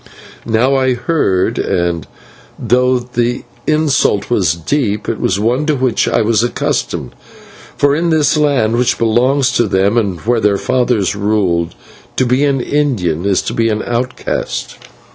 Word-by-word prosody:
Now 115 +4 +2
I 130 -2 +2
heard, 120 - 0
and 85 -4 -1 0.5
though 125 +1 +2
the 120 0 -2 0.2
insult 150 -9 +1
was 90 -9 +2
deep, 105 - -2
it 115 - -2
was 95 - 0
one 125 +8 0
to 155 - +2
which 130 -3 0
I - - +1
was 110 0 +2
accustomed, 120 - -2 0.6
for 145 0 +3
in 170 +2 0
this 155 -2 +2
land, 140 -7 +1
which 125 0 +1
belongs 125 +4 +2
to 120 -2 +1
them 100 +4 +2
and 95 -6 -2
where 120 +1 +1
their 105 -2 +2
fathers 120 -5 0
ruled, 95 -5 0 0.4
to 130 - +1
be 125 +3 +1
an 140 -2 +1
Indian 105 - -1
is 95 -2 +1
to - - -4
be 115 0 +1
an 105 0 -1
outcast. 120 +2 -3
120 Hz, 155 wpm, -15 LUFS, 105-130 Hz, 0.6 s, for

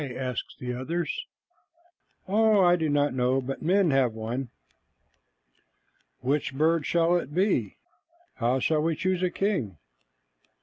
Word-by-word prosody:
asked 125 -2 -4
the 125 -1 -4
others. 165 +8 -3 1.0
"Oh, 215 +1 +4
I 175 0 +5
do 160 -3 -1
not 145 -1 +1
know, 130 +1 +1
but 135 +1 -5
men 185 0 +3
have 130 -4 +2
one." 115 +4 -4 1.7
"Which 135 +1 -1
bird 160 +1 +2
shall 170 +1 +3
it 150 -3 -5
be? 195 +4 +1 0.6
How 125 +2 +1
shall 150 +4 +1
we 165 +1 0
choose 185 +2 -1
a 180 - +2
king?" 185 - -2
150 Hz, 130 wpm, -27 LUFS, 130-175 Hz, 1.7 s, I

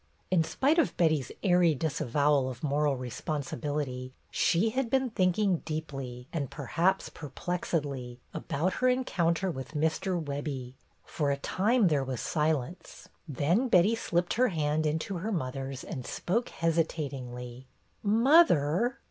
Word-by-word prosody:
In 175 -3 +4
spite 285 - +2
of 320 - +1
Betty's 155 -6 +2
airy 175 -4 +4
disavowal 140 -1 +1
of 125 +1 -9
moral 145 -1 +1
responsibility, 130 0 -4 0.2
she 195 +6 +2
had 260 0 -1
been 265 -1 +1
thinking 185 -1 +2
deeply, 135 -6 -6
and 145 -6 -2
perhaps 170 +7 0
perplexedly, 145 -4 -3 0.2
about 170 +6 -1
her 255 - +4
encounter 185 -8 +1
with 130 -1 -7
Mr. 160 +4 0
Webbie. 140 -4 -4 0.3
For 145 -3 -1
a 140 - +1
time 210 - +2
there 145 -4 +2
was 130 -3 -4
silence. 155 +1 -2 0.2
Then 165 - +1
Betty 200 0 +5
slipped 175 -6 0
her 250 +3 +3
hand 155 -4 0
into 160 +5 -2
her 210 +6 -3
mother's 135 -5 -3
and 130 -6 -6
spoke 230 - -1
hesitatingly. 130 -7 -2 0.3
"Mother?" 230 - +4
155 Hz, 130 wpm, -29 LUFS, 140-185 Hz, 0.3 s, Betty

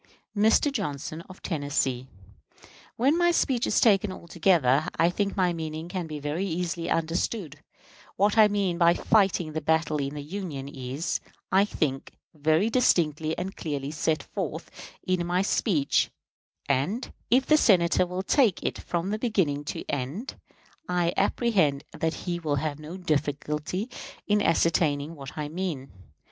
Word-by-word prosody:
Mr. 220 +7 +4
Johnson, 155 - -4
of 185 - -13
Tennessee: 145 -5 -1 0.9
When 270 +6 +3
my 345 0 +4
speech 260 -8 +1
is - - +2
taken 205 -3 +4
altogether, 165 -6 +2
I 170 +1 +4
think 200 +2 -2
my 180 -2 +2
meaning 160 0 -5
can 180 -2 -3
be 155 -1 -5
very 150 +5 -2
easily 170 -1 -2
understood. 165 - -1 0.6
What 205 +2 +2
I 215 -2 +7
mean 195 -4 0
by 170 0 +5
fighting 190 -7 +2
the 160 - -2
battle 160 0 +1
in 140 0 -3
the 145 - -5
Union 155 -5 -5
is, 135 +2 -3 0.3
I 195 +2 +5
think, 135 -9 -2 0.2
very 155 +6 +2
distinctly 160 - +2
and 190 +1 -4
clearly 145 -3 -4
set 155 +1 0
forth - - -5 0.3
in 185 -1 0
my 180 +2 +1
speech; 170 -7 +1 0.6
and, 145 - -1 0.2
if 255 +4 +4
the 305 - +5
Senator 180 - +4
will 180 +1 -3
take 225 -3 +3
it - - -2
from 175 +3 -2
beginning 180 - 0
to - - -5
end, 145 - -3 0.6
I 175 -1 +1
apprehend 190 - +2
that 160 0 -2
he 175 -1 -2
will 155 -4 -1
have 150 0 -2
no 155 +4 -8
difficulty 150 - -2 0.4
in 210 0 +2
ascertaining 160 -4 +2
what 140 -3 -10
I 150 -1 -2
meant. 155 -5 -4
170 Hz, 150 wpm, -27 LUFS, 150-195 Hz, 0.9 s, I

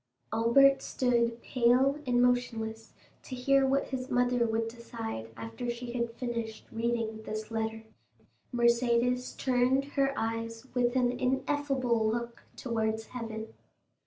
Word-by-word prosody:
Albert 270 +5 +5
stood 235 -2 +1
pale 255 +4 +3
and 245 0 +3
motionless 225 -3 -1 0.3
to 255 - -7
hear 270 +2 +3
what 275 +1 +1
his 260 0 -4
mother 245 -2 +2
would 225 0 0
decide 225 - -6
after 115 - -5
she 240 0 -4
had 235 -1 -1
finished 230 -3 -4
reading 225 -1 -2
this 215 0 -6
letter. 220 0 -2 0.7
Mercédès 240 +1 +2
turned 260 +1 +2
her 275 -1 +1
eyes 230 +1 -3
with 245 0 +1
an 250 -1 +3
ineffable 255 -2 0
look 235 +1 -3
towards 220 -2 -1
heaven. 225 -3 -6
235 Hz, 125 wpm, -30 LUFS, 225-250 Hz, 0.7 s, Albert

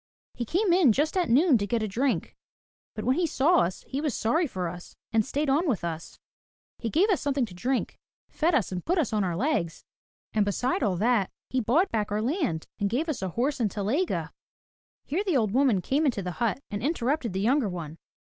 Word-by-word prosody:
He 240 - -4
came 365 - +2
in 335 - +5
just 300 - 0
at 360 -3 +1
noon 270 +1 +5
to 200 - -2
get 230 +1 0
a - - -1
drink. 250 +7 -1 0.6
But 215 - -5
when 255 +2 +2
he 350 -1 +2
saw 315 +5 +3
us, 180 +2 -1
he 275 +2 -3
was 300 -6 -1
sorry 315 +10 +1
for 185 -8 -3
us, 175 +1 -9 0.2
and 225 -1 +4
staid 290 +7 -2
on 295 +5 +2
with 215 -10 -1
us. 165 -1 -5 0.6
He 230 - -2
gave 380 - +3
us 370 - +1
some 285 -1 -1
thing 270 -4 +2
to 200 - -12
drink, 250 +9 -2 0.3
fed 330 +1 +1
us 225 -10 +1
and 180 -1 -4
put 360 +3 0
us 270 -9 0
on 210 -2 +2
our 175 -3 -1
legs. 205 - -1 0.5
And 215 - +3
beside 225 +7 0
all 205 -7 +1
that, 215 0 +2 0.2
he 260 - +1
bought 300 - +2
back 210 -2 -1
our 210 - 0
land 245 - -1
and 200 - +1
gave 285 +10 -1
us 290 - -2
a 190 - -2
horse 260 - -1
and 225 -4 +1
telyega." 220 - -1 0.7
Here 340 +8 -1
the 365 -9 +1
old 215 -5 +1
woman 250 -5 +3
came 290 - +1
into 220 -7 -1
the 180 - -3
hut 235 +3 0
and 205 -1 -3
interrupted 265 - -1
the 190 - -1
younger 245 +1 +2
one. 165 -3 -7
245 Hz, 225 wpm, -27 LUFS, 205-300 Hz, 0.7 s, in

